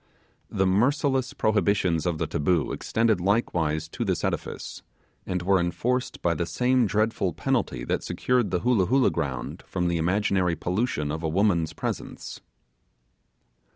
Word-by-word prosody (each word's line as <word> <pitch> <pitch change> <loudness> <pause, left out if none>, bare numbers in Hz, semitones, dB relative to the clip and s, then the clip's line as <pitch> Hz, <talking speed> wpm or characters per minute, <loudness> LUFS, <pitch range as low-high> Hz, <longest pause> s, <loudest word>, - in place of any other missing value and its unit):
The 95 - +1
merciless 130 +6 +2
prohibitions 95 -5 +1
of 85 -2 0
the - - -1
taboo 80 +2 0
extended 110 -4 +1
likewise 80 -6 0
to - - -3
this - - -1
edifice, - - -4 0.5
and 90 -1 -2
were 95 +1 +3
enforced 100 +9 -1
by 85 - +3
the 85 +1 -2
same 125 +7 +2
dreadful 105 -3 0
penalty - - -1
that - - -1
secured 125 -3 0
the 90 -2 -1
Hoolah 115 -7 +2
Hoolah 130 +2 +3
ground 70 -6 -4
from 90 0 -1
the 85 - 0
imaginary 90 0 +1
pollution 90 -6 -1
of 80 +1 -4
a 80 - -1
woman's 85 -2 +1
presence. - - -5
95 Hz, 145 wpm, -26 LUFS, 85-115 Hz, 0.5 s, were